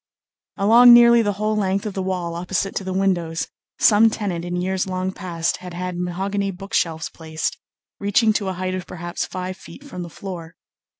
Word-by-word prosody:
Along 235 +4 +8
nearly 235 0 +7
the 205 -2 0
whole 215 +2 -1
length 195 -1 0
of 210 - -3
the 190 - -3
wall 180 -2 -2
opposite 180 +3 -2
to - - -3
the 190 - -4
windows, 180 -4 0 0.3
some 220 +1 +6
tenant 195 -6 -3
in 175 0 -4
years 185 +1 -1
long 185 0 -2
past 170 -3 -2
had 180 -1 -9
had 180 0 -4
mahogany 195 +3 -2
book 195 +3 -9
shelves 160 -1 0
placed, 160 -1 -4 0.4
reaching 210 +2 +3
to 205 -2 -1
a 190 - -1
height 185 +1 -3
of 185 -1 -5
perhaps 175 0 -4
five 185 0 -5
feet 275 - -13
from 250 -11 -8
the 170 - -6
floor. 170 -1 -8
185 Hz, 190 wpm, -22 LUFS, 175-200 Hz, 0.4 s, Along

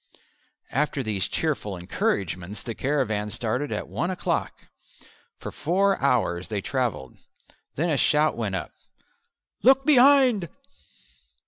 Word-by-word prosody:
After 145 -1 0
these 105 -4 -1
cheerful 125 - -2
encouragements 90 +2 -3
the 115 - -5
caravan 110 -6 -1
started 125 +7 -3
at - - -3
one 175 - -2
o'clock. 185 - -3 0.7
For - - -7
four 195 +5 +1
hours 110 -10 +1
they 105 -1 -3
travelled. 120 - -3 0.6
Then 165 +3 0
a 145 - +2
shout 150 +3 +3
went 105 -5 -2
up 85 - -5 0.9
"Look 270 +2 +5
behind!" 260 - +5
130 Hz, 115 wpm, -25 LUFS, 105-170 Hz, 0.9 s, Look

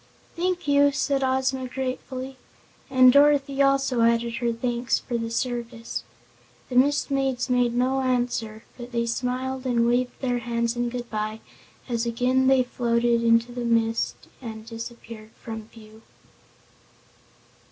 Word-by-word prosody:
"Thank 355 -2 -1
you!" 285 0 +5
said 275 -1 0
Ozma 260 0 0
gratefully, 260 0 -5 0.5
and 255 -2 +6
Dorothy 280 -1 +4
also 275 -3 +2
added 235 0 +2
her 240 -2 0
thanks 240 +1 -1
for 240 - -5
the 230 -1 -2
service. 235 -1 -3 0.7
The 250 - -5
Mist 285 +3 +3
Maids 265 -2 0
made 245 -1 +2
no 260 +2 +1
answer, 240 -4 -1 0.2
but 240 0 -9
they 235 0 0
smiled 255 +2 -2
and 235 -2 +2
waved 245 +1 0
their 245 -2 -1
hands 235 0 -1
in 240 0 -1
good 240 0 -5
bye 215 0 -3 0.5
as 235 -2 -1
again 255 +3 +2
they 265 -1 +5
floated 235 -1 +1
out 235 - 0
into 230 +1 +3
the 245 0 -4
mist 230 -1 +1 0.3
and 220 -3 -8
disappeared 230 -1 -9
from 220 -1 -7
view. 220 -1 -16
245 Hz, 140 wpm, -25 LUFS, 235-260 Hz, 0.7 s, and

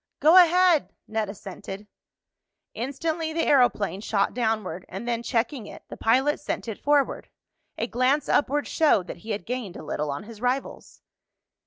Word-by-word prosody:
"Go 315 +4 +6
ahead," 360 -2 +5
Ned 220 -2 -2
assented. 200 0 -8 0.9
Instantly 315 +6 -3
the 330 - 0
aeroplane 230 -8 +2
shot 205 -2 0
downward, 215 -7 -1
and 195 +6 -6
then, 235 -1 -1
checking 235 -1 -1
it, - - -11
the - - -7
pilot 265 +6 +2
sent 290 - -4
it 220 - -5
forward. 290 -1 +1 0.5
A - - -1
glance 255 +5 +1
upward 290 +1 +1
showed 290 - +3
that - - -7
he 215 +6 -12
had 210 -1 -3
gained 240 -6 -4
a - - -9
little 150 -1 -3
on 140 +5 -4
his 220 0 -12
rivals. 250 +2 -3
240 Hz, 160 wpm, -25 LUFS, 210-290 Hz, 0.9 s, Go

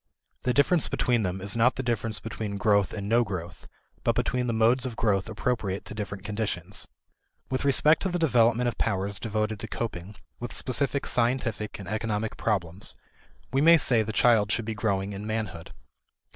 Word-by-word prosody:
The 125 - 0
difference 155 +3 +3
between 120 -2 +1
them 95 -1 -2
is 100 +3 -2
not 120 +2 +3
the 130 - -3
difference 115 -3 -1
between 105 -2 -5
growth 100 -2 +2
and 100 -2 -5
no 115 +3 +4
growth, 90 -5 -7 0.4
but - - +2
between 125 0 0
the - - +1
modes 115 +3 +3
of 120 - -6
growth 105 -2 +1
appropriate 110 -4 -2
to - - -5
different 105 -2 -5
conditions. 105 -3 -2 0.6
With 130 - -1
respect 150 +3 +4
to 190 - 0
the 175 - -1
development 120 -6 +3
of 120 - -3
powers 100 -1 0
devoted 110 -1 -2
to - - -5
coping 105 -3 -5 0.2
with 120 - -5
specific 140 +2 +1
scientific 115 -3 0
and 100 - -9
economic 110 +1 -2
problems 95 -4 -2 0.6
we 135 - +3
may 165 +2 +8
say 125 -6 +3
the 110 0 -3
child 110 -2 +3
should 115 - 0
be 110 - -3
growing 100 -2 -1
in 100 +2 -6
manhood. 110 -7 -4
110 Hz, 180 wpm, -27 LUFS, 100-120 Hz, 0.6 s, may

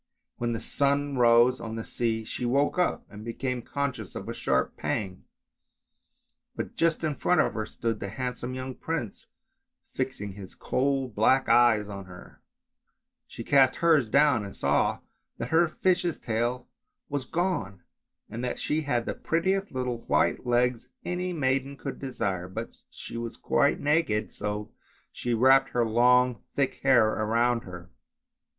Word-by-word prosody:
When 120 -1 -1
the 115 - -3
sun 140 +2 0
rose 120 +1 +5
on 110 -1 -6
the 115 - -5
sea 115 -2 -1
she 115 - -6
woke 140 +7 +1
up 180 - 0
and 105 +1 -11
became 125 +2 -3
conscious 130 -5 -4
of - - -6
a - - -3
sharp 65 0 0
pang, 95 -3 -3 1.3
but - - -5
just 165 0 +1
in 155 -2 0
front 180 +5 +1
of - - 0
her 110 -1 -3
stood 115 -2 -3
the 100 - -4
handsome 125 +2 -4
young 130 0 -5
prince, 145 -8 -5 0.6
fixing 130 -6 -3
his 95 -1 -10
coal 135 0 0
black 120 +4 +2
eyes 115 -4 +4
on 100 -2 -7
her; 90 -1 -14 0.9
she 115 - -8
cast 135 0 +4
hers 155 -8 +3
down 140 -4 +4
and 100 - -8
saw - - +1 0.4
that - - -4
her 165 +1 +4
fish's 180 +1 0
tail 120 +2 -2 0.4
was 140 -3 -3
gone, 165 - -2 0.4
and 115 +2 -6
that 125 - -2
she 155 +1 -1
had 125 -6 -1
the - - -2
prettiest 190 +4 -1
little 125 -2 -2
white - - +1
legs 125 0 +1 0.2
any 180 +1 -2
maiden 135 -3 -1
could 135 - -6
desire, 95 -9 -3
but 95 - -6 0.2
she - - -8
was 115 -1 -5
quite - - +2
naked, 145 -8 +1
so 105 +1 -4 0.4
she 120 -1 -2
wrapped 135 +3 +5
her 120 -1 +1
long 125 +2 +3
thick 140 -2 0
hair 125 -5 +5
around 115 +3 +1
her. 90 -1 -10
125 Hz, 155 wpm, -27 LUFS, 110-140 Hz, 1.3 s, rose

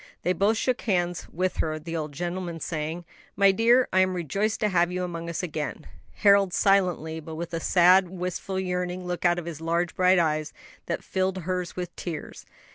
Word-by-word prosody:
They 180 - +2
both 205 +5 +2
shook 250 +2 0
hands 175 -5 -1
with 185 +2 -2
her, 155 -1 -1
the 165 +2 -6
old 155 -2 -3
gentleman 175 +2 -4
saying, 160 +2 -4 0.3
"My 200 0 +5
dear, 235 +5 +4
I 185 - +4
am 185 0 +3
rejoiced 195 +6 -1
to 210 - +2
have 175 -2 +2
you 180 0 -2
among 170 -1 -5
us 170 - -3
again;" 155 -2 -4 0.3
Harold 200 -2 +4
silently, 180 -5 +2
but 160 0 -8
with 170 +1 -6
a 165 - -1
sad, 180 +2 +5
wistful, 185 +1 -4
yearning 180 -1 -3
look 180 0 -3
out 175 0 +4
of 175 - -4
his 165 -2 -7
large 170 +1 -1
bright 185 +1 +4
eyes, 155 -3 0 0.3
that - - -3
filled 190 -1 -1
hers 180 0 -3
with 180 -1 -5
tears. 165 -4 -7
180 Hz, 195 wpm, -26 LUFS, 165-185 Hz, 0.3 s, My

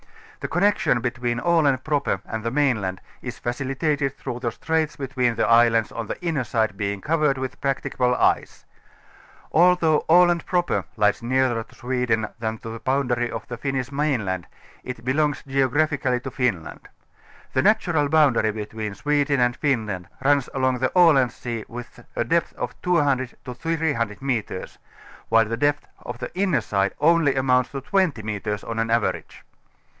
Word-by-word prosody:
The - - -4
connection 175 - +2
between 120 0 -2
Aland 145 -4 +2
proper 145 -2 0
and 110 -1 -5
the 115 - 0
mainland 115 -9 0 0.2
is - - -6
facilitated 135 +3 -1
through 120 - -5
the 120 -2 -2
straits 160 +4 -1
between 130 -4 -1
the - - +1
islands 115 -1 +4
on 115 -2 -5
the - - -5
inner 160 -6 0
side 110 -2 0
being 100 0 -2
covered 150 +2 +1
with 130 0 -5
practicable 130 -2 0
ice. - - 0 0.9
Although 170 -2 +4
Aland 175 0 +5
Projjer 175 -1 0
lies 105 +2 +2
nearer 125 -1 +1
to 115 - -14
Sweden 125 -3 -1
than 110 -1 -2
to 115 - -9
the 115 0 -6
boundary 125 -2 0
of - - -6
the 120 - -6
Finnish 135 0 -3
mainland 115 - -1 0.4
it 125 -1 -7
belongs 145 +3 +1
geogra 135 +3 +2
phically 125 -4 -1
to 135 - -5
Finland. 125 -10 -2 0.6
The 130 - +3
natural 170 -7 +2
boundary 140 -8 +4
between 105 -1 -5
Sweden 145 0 +1
and 120 0 +2
Finland 110 - -1 0.2
runs 140 -2 +3
along 130 -1 +1
the 130 - 0
Aland 145 -8 +5
Sea 115 -3 -5
with 120 0 -10
a - - +1
depth 165 +8 0
of 125 0 -4
200 140 -8 +1
ŌĆö 125 -2 -6
300 145 -8 -1
metres, 120 -8 -3 0.5
while 115 0 +5
the 115 +1 -3
depth 145 +3 +1 0.2
on 120 - -6
the 125 - -6
inner 185 -5 +1
side 100 -1 -1
only 160 -3 +4
amounts 125 -1 +2
to 135 - -5
20 170 - 0
metres 105 0 -3
on 115 0 -4
an 115 0 0
average. 115 -1 -1
130 Hz, 160 wpm, -23 LUFS, 115-145 Hz, 0.9 s, Aland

